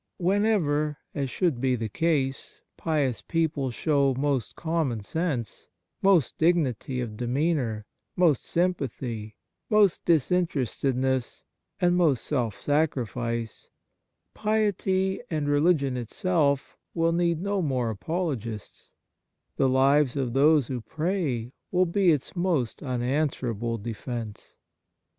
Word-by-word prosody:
Whenever 175 -7 +1
— - - -50
as 140 -2 -2
should 155 -5 0
be 130 -1 +2
the 115 -2 -3
case 135 +1 -1
— - - -55
pious 145 -7 0
people 160 -5 -1
show 140 +1 +1
most 135 -3 -1
common 160 -10 -1
sense, 135 - -3 0.3
most 190 -9 +3
dignity 150 -6 +1
of 115 -4 -4
demeanour, 125 -2 -1 0.3
most 165 -7 +3
sympathy, 130 - -2 0.3
most 210 -4 +4
disinterested 150 - +1
ness 130 -2 -1 0.4
and 175 0 +3
most 160 -8 +2
self 120 -8 -1
sacrifice, 120 -6 -1 0.6
piety 195 -3 0
and 155 -3 -1
religion 145 -2 +2
itself 140 - 0 0.2
will 165 0 +2
need 170 -1 +1
no 200 +1 -1
more 125 -8 -1
apolo 165 - -1
gists; 110 -2 -9 0.7
the 135 - +3
lives 135 +1 +3
of 130 -4 -1
those 145 +1 +5
who 125 0 -4
pray 150 - -2 0.2
will 185 0 +3
be 180 +1 +3
its 150 +4 -2
most 175 -9 0
unanswerable 125 -3 -1
defence. 115 0 -6
145 Hz, 115 wpm, -26 LUFS, 125-170 Hz, 0.7 s, those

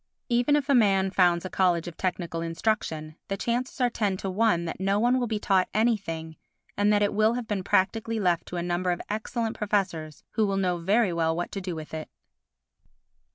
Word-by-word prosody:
Even 245 +4 +3
if 290 -2 0
a 280 - +3
man 195 -5 +3
founds 175 -2 +3
a - - -3
College 175 -3 +2
of 170 - -7
Technical 175 -2 -2
Instruction, 165 -3 -2
the 195 - -2
chances 245 +6 -2
are 245 -1 +2
ten 205 -5 0
to 190 0 -4
one 190 -4 +2
that 165 - -5
no 195 +2 +1
one 245 +3 +3
will 245 - -1
be 220 -1 -1
taught 190 -3 +2
anything 190 -8 0 0.4
and 205 +1 +3
that 205 0 +3
it 205 - +1
will 215 +3 +3
have 245 -2 -4
been 200 -3 -2
practically 220 +4 +1
left 175 -4 +1
to 180 - -5
a 170 - -2
number 175 +1 -1
of 175 - -2
excellent 220 +1 -2
professors 185 -7 -2
who 220 -2 +1
will 195 0 0
know 180 -2 +1
very 195 +3 +2
well 165 -1 +1
what 175 +1 -3
to 195 - -4
do 180 -2 -4
with 155 -1 -8
it. 155 -1 -5
195 Hz, 210 wpm, -27 LUFS, 175-220 Hz, 0.4 s, Even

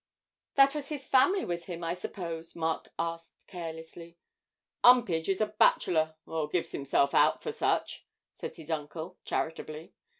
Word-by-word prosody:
'That 275 0 +6
was 295 -2 -4
his 290 -3 -5
family 370 +10 +4
with 170 -1 -3
him, 175 -2 -6
I 165 0 -1
suppose?' 170 -2 -6
Mark 160 -1 -2
asked 165 0 -5
carelessly. 165 -1 -8 0.7
''Umpage 200 -10 +5
is 195 +2 +1
a - - +5
bachelor, 160 -2 +3
or 160 -2 -2
gives 175 +1 -1
himself 140 0 +1
out - - +4
for - - -2
such,' - - -1 0.3
said - - -7
his 160 0 -9
uncle, 160 +3 -5
charitably. 160 0 -4
165 Hz, 145 wpm, -30 LUFS, 160-185 Hz, 0.7 s, That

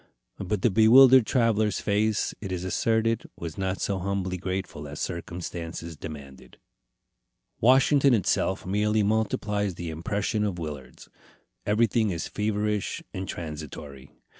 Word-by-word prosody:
But 100 +1 -2
the 120 - +4
bewildered 120 +3 +7
traveller's 110 -5 +2
face, 105 +1 0
it 95 -3 -5
is 90 -1 -3
asserted, 115 +4 0
was 85 -2 -6
not 95 0 -2
so 100 -2 -1
humbly 95 0 -2
grateful 95 -5 -4
as 70 - -8
circumstances 85 -1 -5
demanded. 70 -4 -10 1.0
Washington 135 +2 +5
itself 95 -2 0
merely 105 +3 +1
multiplies 105 -2 0
the 85 -1 -5
impression 100 +6 -2
of 100 -4 -2
Willard's. 75 -6 -8 0.6
Everything 110 +1 +2
is 85 -3 -3
feverish 105 -1 -2
and 95 0 -5
transitory. 75 -5 -7
100 Hz, 120 wpm, -26 LUFS, 85-110 Hz, 1.0 s, bewildered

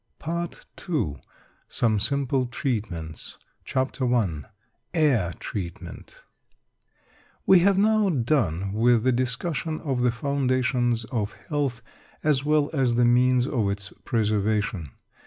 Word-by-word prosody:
PART 170 +1 -4 0.2
II 110 - -1 0.5
SOME 110 -3 +1
SIMPLE 135 +1 +1
TREATMENTS 100 - -4 0.3
CHAPTER 130 -1 -1
I 90 -11 0 0.5
AIR 130 - +2
TREATMENT 90 -5 -7 1.2
We 190 - +7
have 190 +2 +3
now 215 0 +3
done 115 - 0
with 115 +1 +3
the 130 - +3
discussion 135 +6 -1
of 135 -5 -1
the 125 - +3
foundations 125 -2 0
of 110 -4 -3 0.2
health, 140 -6 -1 0.4
as 145 -3 +2
well 150 0 +2
as 130 -5 +2
the 120 0 +4
means 125 +1 +4
of 115 -7 0
its 100 0 -4
preservation. 105 - 0
125 Hz, 115 wpm, -25 LUFS, 110-140 Hz, 1.2 s, We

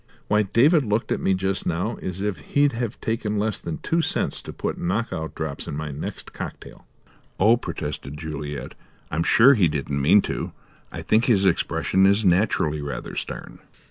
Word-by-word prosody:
Why, 105 0 +3
David 135 - +4
looked 110 0 -1
at - - +1
me 95 - +2
just 95 +1 -1
now 90 +7 -1
as 95 +1 -4
if 100 -5 -2
he'd 145 - +2
have 120 -1 -4
taken 110 -2 -1
less 105 0 0
than 85 - -5
two 165 +1 0
cents 160 - -1
to - - -8
put - - -4
knock 100 +5 -1
out 80 -2 -5
drops 80 -3 -4
in 70 - -4
my 75 -1 -4
next 70 +2 -6
cocktail." - - -8 0.5
"Oh," 110 +4 +6
protested 75 - -5
Juliet. 75 -2 -5 0.4
"I'm 80 - 0
sure 120 +10 +6
he 100 -9 +4
didn't 70 -2 -2
mean 95 +9 +5
to. - - -4 0.4
I - - -6
think 110 +3 +3
his 100 -6 +3
expression 95 +1 +2
is 100 +2 +3
naturally 85 -5 +2
rather 70 -4 -5
stern." - - -6
95 Hz, 180 wpm, -24 LUFS, 80-110 Hz, 0.5 s, Oh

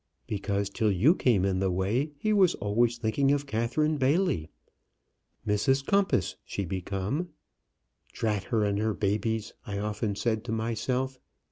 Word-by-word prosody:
Because 100 -1 -2
till 110 0 +1
you 105 - +5
came 115 - +2
in 95 -1 +1
the 95 0 +1
way 100 - 0
he 215 +9 0
was 190 -4 +4
always 115 +4 +1
thinking 125 +4 +1
of 145 0 +1
Catherine 140 +6 0
Bailey. 135 - +1 1.0
Mrs 130 +6 +2
Compas 195 - +1
she 100 - -4
become. 95 - -3 0.8
'Drat 105 -4 -1
her 115 -4 +1
and 100 0 0
her 110 -1 0
babies!' 110 +2 -1
I 100 -1 -3
often 105 0 -2
said 110 0 -1
to - - -4
myself. 125 +4 -1
110 Hz, 145 wpm, -28 LUFS, 100-135 Hz, 1.0 s, you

